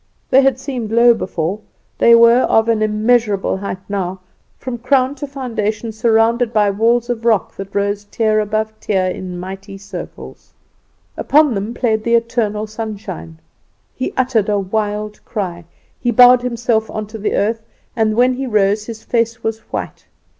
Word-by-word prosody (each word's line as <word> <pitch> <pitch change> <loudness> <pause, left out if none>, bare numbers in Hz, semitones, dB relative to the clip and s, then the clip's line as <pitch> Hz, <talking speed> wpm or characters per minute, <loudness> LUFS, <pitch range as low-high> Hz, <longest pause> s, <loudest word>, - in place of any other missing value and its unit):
They 265 - +7
had 270 -2 +2
seemed 255 -5 -5
low 235 +1 +6
before; 185 -3 -3 0.4
they 235 - +7
were 235 +1 +6
of 225 -3 +2
an 225 -2 +1
immeasurable 215 -2 +1
height 190 -1 -6
now, 190 -2 -3 0.4
from 240 -2 -6
crown 260 +2 +2
to 290 +1 -7
foundation 230 -5 -3
surrounded 225 +1 +2
by 210 -3 +2
walls 230 +4 +1
of 230 -1 -4
rock, 225 -3 +1
that 195 0 -8
rose 200 0 -1
tier 215 +1 +1
above 215 +1 -1
tier 190 -3 0
in 185 -1 -4
mighty 195 +2 -8
circles. 200 +1 -10 0.6
Upon 300 -2 +3
them 210 +3 -4
played 220 -4 0
the 235 +1 +2
eternal 230 -2 0
sunshine. 210 - -7 0.6
He 255 - -3
uttered 245 -5 +1
a 205 - +2
wild 210 +1 -3
cry. 175 -6 -5 0.3
He 240 - -1
bowed 245 0 +7
himself 235 -2 -1
on 215 -1 -4
to 215 +1 -9
the 210 - -1
earth, 225 +3 0 0.3
and 220 -2 +1
when 250 +2 +3
he 265 +1 -4
rose 210 -1 +1
his 225 -2 -8
face 230 0 -1
was 225 0 -2
white. - - -5
220 Hz, 160 wpm, -17 LUFS, 205-240 Hz, 0.6 s, They